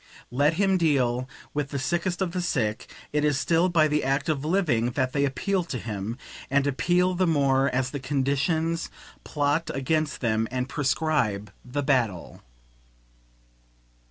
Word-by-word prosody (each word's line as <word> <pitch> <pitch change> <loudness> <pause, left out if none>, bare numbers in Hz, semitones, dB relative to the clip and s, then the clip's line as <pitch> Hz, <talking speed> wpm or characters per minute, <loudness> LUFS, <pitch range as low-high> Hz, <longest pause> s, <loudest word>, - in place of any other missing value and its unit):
Let 145 +5 +3
him 195 0 +2
deal 130 -6 +1 0.2
with 145 -1 -2
the 140 - -3
sickest 175 +6 -1
of 180 - -2
the 180 0 -2
sick, 110 -11 -1 0.2
it 150 0 +1
is 145 -2 +2
still 170 +3 +2
by 160 -3 +4
the 150 0 0
act 135 +4 0
of 145 -3 0
living 155 -9 +1
that 130 -1 0
they 140 -1 +2
appeal 185 +7 0
to 135 - -4
him, 110 0 -4 0.3
and 140 +1 +2
appeal 175 +6 +2
the 185 0 +1
more 140 -3 +3
as 130 0 -1
the 145 - -4
conditions 145 +5 0 0.3
plot 150 +2 0
against 150 +3 -1
them 110 -2 0
and 125 0 -2
prescribe 130 -9 0
the 140 +4 -3
battle. 120 - 0
145 Hz, 155 wpm, -26 LUFS, 130-165 Hz, 0.3 s, by